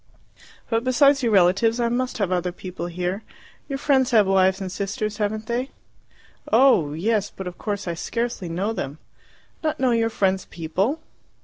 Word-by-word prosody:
"But 225 0 0
besides 275 +2 +4
your 235 -3 +1
relatives 200 +5 +4
I 235 - +2
must 250 +2 -1
have 200 -5 -1
other 180 0 0
people 180 -1 -6
here. 180 +3 -3 0.5
Your 275 - -2
friends 270 -2 +2
have 220 -4 +5
wives 190 0 +3
and 190 -2 -5
sisters, 205 +2 -3
haven't 215 +1 -2
they?" 245 +4 -2 0.8
"Oh, 225 - +5
yes; 205 +5 0
but 190 - -8
of 180 -1 -7
course 205 -3 -3
I 170 - -1
scarcely 230 +1 -3
know 190 +7 -1
them." 140 -8 -5 0.7
"Not 310 0 -1
know 260 -2 +2
your 230 -1 +2
friends' 190 -3 0
people?" 190 - -2
210 Hz, 170 wpm, -23 LUFS, 185-240 Hz, 0.8 s, have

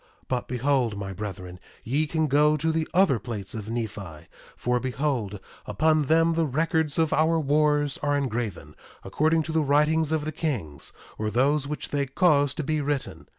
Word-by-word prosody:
But 125 -2 -2
behold, 125 -3 0
my 100 -1 -5
brethren, 95 -2 -7 0.2
ye 145 +6 0
can 160 +1 0
go 150 +2 +3
to 160 +2 0
the 160 0 -1
other 175 -9 +3
plates 105 -6 -6
of 110 -1 -6
Nephi; 100 -9 -5 0.3
for 125 0 0
behold, 125 -6 -2 0.3
upon 155 +8 +2
them 165 +3 +3
the 165 -1 +1
records 160 +2 0
of 160 -2 +2
our 160 +1 +3
wars 150 -1 +2
are 145 -1 +1
engraven, 120 -8 -3 0.3
according 160 +1 +1
to 160 - -5
the 160 0 +2
writings 150 +2 +2
of 155 -2 0
the 155 - -2
kings, 120 - -3 0.3
or 110 0 -1
those 140 +6 +1
which 150 +1 -5
they 140 -1 -1
caused 145 -1 +2
to 155 - -2
be 155 +1 0
written. 145 -1 -3
145 Hz, 175 wpm, -26 LUFS, 120-155 Hz, 0.3 s, go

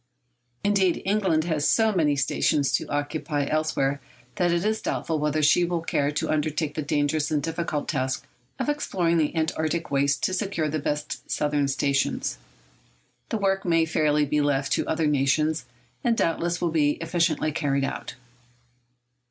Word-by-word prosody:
Indeed, 195 -3 +2
England 190 -6 +2
has 155 -3 0
so 220 -1 +3
many 155 -6 +2
stations 140 +1 +1
to - - -1
occupy 145 0 -2
elsewhere 145 -2 0 0.4
that 175 -1 +2
it 170 +3 0
is 220 +1 0
doubtful 160 -2 -2
whether 150 +1 0
she 150 +4 +5
will 175 -1 -1
care 145 -3 0
to 150 - -2
undertake 155 0 -1
the 155 - -3
dangerous 145 0 0
and 150 - +1
difficult 165 -2 -2
task 130 -3 -2 0.3
of - - -2
exploring 180 - +1
the 155 +1 0
Antarctic 160 0 -1
wastes 140 -1 +2
to 185 - 0
secure 190 -6 -1
the 155 +1 -1
best 150 +1 -4
southern 145 -1 +1
stations. 135 - 0 0.9
The 225 - -1
work 195 -1 +1
may 165 -2 +3
fairly 150 -2 +2
be 150 +1 +1
left 140 -1 0
to - - +1
other 160 0 0
nations, 150 +1 +1 0.4
and 235 -2 +2
doubtless 170 +1 0
will 170 - 0
be 150 -2 +3
efficiently 165 -2 0
carried 140 -3 0
out. 135 - -4
155 Hz, 160 wpm, -25 LUFS, 145-170 Hz, 0.9 s, she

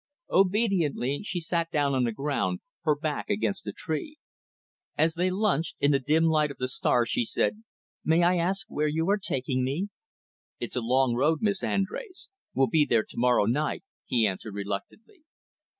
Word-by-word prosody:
Obediently, 185 - +2
she 185 -4 -3
sat 170 0 -1
down 145 -3 +1
on 130 -2 +2
the 115 - 0
ground, 145 - -1 0.2
her 150 -2 +4
back 150 +3 -3
against 200 -1 -1
a - - -1
tree. 180 - -5 0.8
As 160 +2 +3
they 180 +2 +1
lunched, 185 -5 0
in 145 - +3
the 140 - +3
dim 155 +5 +2
light 155 -2 +3
of 140 - -9
the 130 - -2
stars, 120 -2 +1
she 120 - +1
said, 215 - -1 0.4
"May 165 +2 +3
I 180 +1 +4
ask 190 +5 0
where 150 -8 -1
you 160 +3 0
are 205 - +2
taking 130 -7 -1
me?" 150 +11 -2 0.7
"It's - - -5
a 125 - 0
long 130 +1 +2
road, 150 - +1
Miss 200 -2 +1
Andrés. 360 - -3 0.3
We'll 135 - +4
be 150 +5 +3
there 115 -6 +2
to - - -5
morrow 125 -3 +4
night," 150 - -1 0.2
he 115 -3 +3
answered 100 +1 -3
reluctantly. 100 - -6
155 Hz, 180 wpm, -27 LUFS, 130-185 Hz, 0.8 s, her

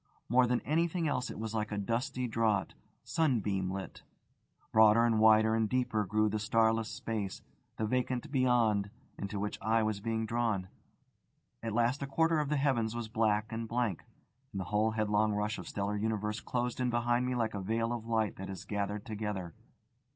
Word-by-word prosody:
More 125 +1 +5
than 125 0 +1
anything 165 +3 0
else 130 -3 -1
it - - -7
was 110 0 -4
like 105 -1 -2
a 105 - -2
dusty 125 +5 -1
draught, 110 -5 +1 0.3
sunbeam 105 - 0
lit. 95 0 -6 0.7
Broader 110 +1 +6
and 115 -2 +2
wider 110 0 +6
and 110 -1 +1
deeper 125 -4 0
grew 110 +2 +2
the 105 +1 -1
starless 110 +1 +2
space, 105 -4 -4 0.3
the 110 - 0
vacant 125 +4 -1
Beyond, 120 -7 +2 0.3
into 100 0 -4
which 105 +1 -3
I 110 +2 +2
was 110 -2 -1
being 115 +1 -1
drawn. 110 -5 -1 0.9
At 115 -2 -3
last 120 +4 +2
a 140 - -2
quarter 160 +3 +2
of 150 -2 -1
the 150 - +1
heavens 120 -5 +1
was 120 -2 -4
black 110 -1 +1
and 115 0 -3
blank, 115 -6 -1 0.5
and 100 - -4
the 95 - -3
whole 105 +1 +3
headlong 110 -1 +1
rush 105 +1 -1
of - - -8
stellar 100 +1 -2
universe 105 0 -1
closed 125 0 -2
in 125 -1 +1
behind 120 +1 +1
me 125 - -1
like 115 -2 0
a 100 - -3
veil 115 +4 0
of 115 -1 -5
light 110 -2 0
that 95 +1 -6
is 95 -1 -7
gathered 100 0 -3
together. 105 -6 -4
110 Hz, 185 wpm, -32 LUFS, 105-120 Hz, 0.9 s, Broader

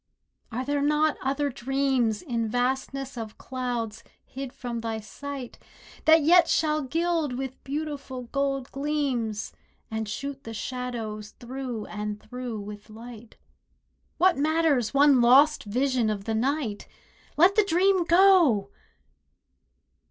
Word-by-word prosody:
Are 250 +3 -3
there 285 +1 0
not 300 +1 +2
other 280 +2 0
dreams 255 -3 0
In 235 -7 -1
vastness 260 +2 -2
of 220 -2 -7
clouds 245 -4 -4 0.2
hid 270 -1 -7
from 245 -3 -5
thy 225 -1 -3
sight 270 +3 -8 0.5
That 315 -1 +6
yet 345 +3 +6
shall 305 -1 +2
gild 320 -1 -1
with 265 0 -6
beautiful 280 -3 -5
gold 275 +1 -2
gleams, 275 -7 -2 0.4
And 220 -1 -3
shoot 275 +5 -5
the 225 0 -7
shadows 225 -4 -5
through 245 -3 -5
and 210 0 -5
through 245 -3 -6
with 205 +1 -9
light? 225 0 -11 0.8
What 360 -3 +4
matters 305 -5 +2
one 280 -2 +5
lost 275 +5 +5
vision 250 +1 +1
of 205 -2 -3
the 225 - -2
night? 240 -2 -1 0.5
Let 360 +5 +6
the 425 - +4
dream 380 0 +3
go!! 340 - +5
260 Hz, 125 wpm, -26 LUFS, 230-290 Hz, 0.8 s, That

